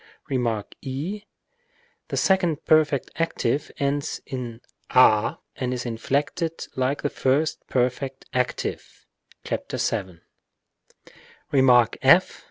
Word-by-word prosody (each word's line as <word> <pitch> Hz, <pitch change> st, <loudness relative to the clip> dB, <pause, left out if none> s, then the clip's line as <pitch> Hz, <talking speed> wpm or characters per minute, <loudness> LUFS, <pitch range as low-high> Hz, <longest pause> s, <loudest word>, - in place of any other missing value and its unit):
Rem. 115 Hz, -5 st, 0 dB, 0.2 s
6. 165 Hz, +11 st, -5 dB, 0.8 s
The -, -, -3 dB
second 175 Hz, -5 st, +2 dB
perfect 150 Hz, -4 st, +3 dB
active 150 Hz, -4 st, -1 dB
ends 140 Hz, 0 st, -1 dB
in 120 Hz, -3 st, -6 dB, 0.3 s
a 110 Hz, -4 st, +5 dB, 0.2 s
and 125 Hz, -1 st, -2 dB
is 125 Hz, -, -5 dB
inflected 145 Hz, +8 st, -2 dB
like 130 Hz, +2 st, -1 dB
the 145 Hz, -, +1 dB
first 145 Hz, +4 st, +1 dB
perfect 130 Hz, +1 st, -1 dB
active 125 Hz, -1 st, -3 dB, 0.4 s
(§ -, -, -3 dB
7). 95 Hz, -6 st, -2 dB, 1.3 s
Rem. 135 Hz, -2 st, +4 dB, 0.3 s
f. -, -, +5 dB
135 Hz, 100 wpm, -24 LUFS, 125-150 Hz, 1.3 s, a